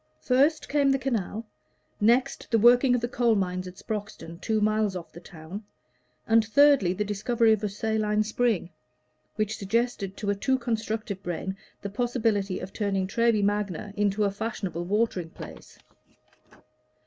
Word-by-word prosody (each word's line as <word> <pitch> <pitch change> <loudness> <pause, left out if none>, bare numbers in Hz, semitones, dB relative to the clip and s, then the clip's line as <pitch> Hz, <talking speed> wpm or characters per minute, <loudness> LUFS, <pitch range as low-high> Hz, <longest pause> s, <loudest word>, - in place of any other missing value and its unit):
First 285 +5 +2
came 285 -1 +2
the 270 - +3
canal; 230 -4 -2 0.5
next, 245 +6 +2
the 230 - +3
working 245 +3 +5
of 245 - -1
the 240 - -1
coal 235 -2 +2
mines 185 -2 -2
at 180 - -9
Sproxton, 200 -6 -6
two 220 +3 0
miles 215 -2 +1
off 175 -2 -7
the 170 - -11
town; 175 +3 -9 0.6
and 225 0 +4
thirdly, 265 -4 +5
the 190 +3 -1
discovery 220 +3 +2
of 215 -1 -2
a 210 - 0
saline 215 +1 0
spring, 215 -5 0 0.6
which 215 0 -1
suggested 200 -1 -1
to 200 -1 -1
a - - 0
too 260 +6 +1
constructive 220 -4 -3
brain 185 +1 -4 0.3
the 200 - -3
possibility 220 -4 0
of 185 +1 -8
turning 195 -3 -1
Treby 230 +1 +2
Magna 205 -1 -1
into 205 0 +1
a 200 - +2
fashionable 200 -5 -4
watering 195 -3 0
place. - - -11
215 Hz, 155 wpm, -27 LUFS, 195-230 Hz, 0.6 s, working